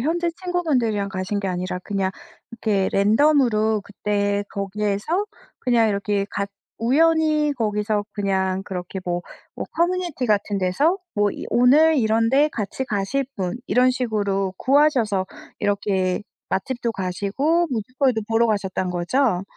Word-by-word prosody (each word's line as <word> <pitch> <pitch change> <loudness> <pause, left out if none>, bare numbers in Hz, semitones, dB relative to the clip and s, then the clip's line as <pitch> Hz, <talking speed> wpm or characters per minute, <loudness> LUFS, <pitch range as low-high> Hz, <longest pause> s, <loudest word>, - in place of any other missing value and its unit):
현지 335 +5 0
친구분들이랑 255 - 0
가신 190 +2 -2
게 200 - -3
아니라 180 0 -3
그냥 195 -1 -1 0.4
이렇게 215 -4 0
랜덤으로 220 -1 +3
그때 205 0 -1
거기에서 210 - -2 0.3
그냥 235 -3 +3
이렇게 200 0 0
같 200 0 -2 0.3
우연히 305 +3 +3
거기서 210 -1 0
그냥 190 -2 0
그렇게 185 0 -5
뭐 175 0 -1 0.4
어 - - -2
커뮤니티 345 -5 0
같은 205 -2 +1
데서 195 - +2 0.2
뭐 205 0 +2
이 - - -7
"오늘 300 +6 +5
이런데 230 +6 +3
같이 225 +2 -4
가실 215 +7 -1
분?" 185 +2 -3
이런 250 +1 +4
식으로 205 -6 -1
구하셔서 255 -9 +2 0.3
이렇게 195 -2 0 0.3
맛집도 240 +3 -2
가시고 205 - 0
뮤지컬도 250 +1 0
보러 230 +1 +3
가셨다는 190 -4 -1
거죠? 180 +3 +1
215 Hz, 300 characters per minute, -22 LUFS, 195-265 Hz, 0.4 s, 오늘